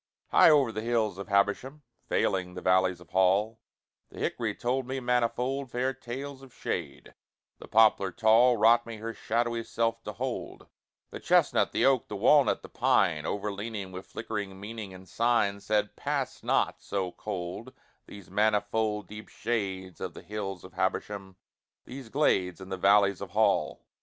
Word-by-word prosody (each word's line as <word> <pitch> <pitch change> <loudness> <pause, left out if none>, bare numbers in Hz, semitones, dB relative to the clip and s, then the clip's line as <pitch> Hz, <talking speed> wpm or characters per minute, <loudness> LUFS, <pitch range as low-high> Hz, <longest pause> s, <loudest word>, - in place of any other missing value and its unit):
High - - +7
o'er 140 -6 +4
the 110 - -4
hills 110 -4 0
of 100 - -6
Habersham, 100 +9 0 0.3
Veiling 90 -1 0
the 90 - -6
valleys 95 -1 +2
of 90 - -17
Hall, 100 +4 +2 0.5
The - - -15
hickory - - -2
told 125 +1 -1
me 135 +1 -3
manifold 125 +2 0
Fair 125 +2 -1
tales 135 +2 -7
of 135 -1 -14
shade, - - -5 0.5
the - - -11
poplar 110 -3 +4
tall 115 +4 +4
Wrought 115 +2 +4
me 115 -1 -7
her 115 +1 -5
shadowy 115 +1 -1
self 115 0 -1
to 105 - -5
hold, 125 +3 -5 0.5
The - - -7
chestnut, - - +3
the - - +1
oak, 135 -4 +3
the 105 - -6
walnut, 140 +8 +4
the - - -9
pine, 75 -3 +1
Overleaning, 100 -1 -4
with 95 +1 -8
flickering 100 -4 -5
meaning 105 -1 -7
and 95 0 -12
sign, 115 -3 +1
Said, 105 0 -1
`Pass - - -3
not, - - +1
so 95 -3 -3
cold, 95 +5 -6 0.4
these 100 -4 -12
manifold 105 0 0
Deep 105 0 -10
shades 95 -5 -3
of - - -5
the - - -10
hills 100 -4 -5
of - - -12
Habersham, 95 -2 -3 0.5
These 130 -2 -9
glades 95 - +1
in 95 0 -10
the 95 - -2
valleys 100 0 +4
of 100 - -6
Hall.' 110 +1 +1
110 Hz, 160 wpm, -28 LUFS, 95-120 Hz, 0.5 s, High